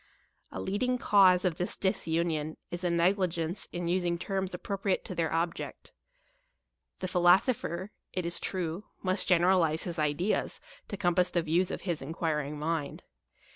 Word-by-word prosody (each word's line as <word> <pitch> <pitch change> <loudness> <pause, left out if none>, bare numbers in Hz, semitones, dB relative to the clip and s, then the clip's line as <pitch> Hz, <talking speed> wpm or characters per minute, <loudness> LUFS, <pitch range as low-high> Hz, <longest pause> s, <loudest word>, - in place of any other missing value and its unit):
A - - -5
leading 250 +6 0
cause 190 -5 +5
of 175 -3 +1
this 180 - -1
disunion 160 -4 0
is 175 +1 -5
a 175 - +2
negligence 175 0 +1
in 175 0 -3
us 180 +2 +1
ing 170 -1 0
terms 190 +1 -2
appropriate 195 +1 -2
to - - -5
their 165 -2 -1
object. 165 +1 -3 1.1
The 185 - -1
philosopher, 185 +1 +2 0.2
it 180 -2 -2
is 170 0 -3
true, 180 +1 -3 0.2
must 185 0 0
generalize 175 -3 +3
his 175 -3 -4
ideas 155 +7 0 0.3
to 200 - -5
compass 180 -2 +2
the 170 -1 0
views 170 +3 +1
of - - -4
his 175 -5 -2
enquiring 150 0 -2
mind. 155 -1 -2
175 Hz, 150 wpm, -30 LUFS, 165-190 Hz, 1.1 s, cause